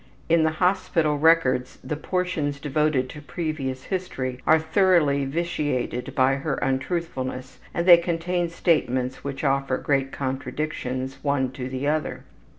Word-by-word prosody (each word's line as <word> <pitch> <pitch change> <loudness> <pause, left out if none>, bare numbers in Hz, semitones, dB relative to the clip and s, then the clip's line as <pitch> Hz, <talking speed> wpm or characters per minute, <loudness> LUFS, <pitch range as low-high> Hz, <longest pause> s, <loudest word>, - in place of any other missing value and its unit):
In 165 0 +5
the 160 0 +2
hospital 175 -5 +1
records 155 -6 +3
the 150 - -3
portions 160 -4 -2
devoted 145 -2 +1
to 150 - -9
previous 145 -4 -4
history 130 -9 -3
are 160 - +7
thoroughly 160 -4 +3
vitiated 145 -5 -2
by 135 +1 +3
her 140 0 -2
untruthfulness, 135 -2 -3
and 170 - -1
they 175 -2 +10
contain 170 +1 -1
statements 130 -7 0
which 140 0 -5
offer 135 -2 +1
great 135 -1 0
contradictions, 135 -1 -3
one 140 -3 0
to 125 -1 -6
the 130 +1 -3
other. 155 +1 -1
145 Hz, 135 wpm, -24 LUFS, 130-165 Hz, -, they